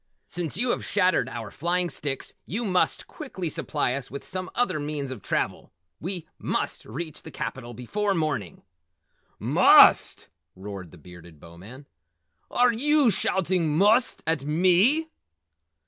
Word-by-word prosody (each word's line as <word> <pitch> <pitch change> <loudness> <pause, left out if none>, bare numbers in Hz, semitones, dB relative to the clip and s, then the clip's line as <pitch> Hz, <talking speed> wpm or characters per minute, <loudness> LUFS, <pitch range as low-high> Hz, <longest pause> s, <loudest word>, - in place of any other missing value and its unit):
Since 175 -2 -3
you 240 +3 +1
have - - -2
shattered 185 - +1
our 115 -5 -7
flying 175 +3 0
sticks 135 -2 -3
you 230 +5 -3
must 185 -3 +1
quickly 195 - -6
supply 145 -4 -1
us 135 -1 -4
with 140 - -8
some 185 0 -4
other 210 -10 +1
means 145 -2 -4
of 125 -6 -7
travel. - - -2 0.3
We 175 -1 -4
must - - -2
reach 155 +7 -6
the - - -10
capital 120 -3 -6
before 200 - -1
morning!" 145 - -3 0.7
"MUST!" - - +5 0.3
roared 95 -2 -8
the 90 - -15
Bearded 85 -1 -14
Bowman. 95 - -13 0.6
"Are 245 -1 +3
yew 285 +1 +3
shouting 175 -5 0
'must' 215 +7 +3
at 160 -4 0
ME?" 185 - +3
160 Hz, 135 wpm, -26 LUFS, 130-195 Hz, 0.7 s, MUST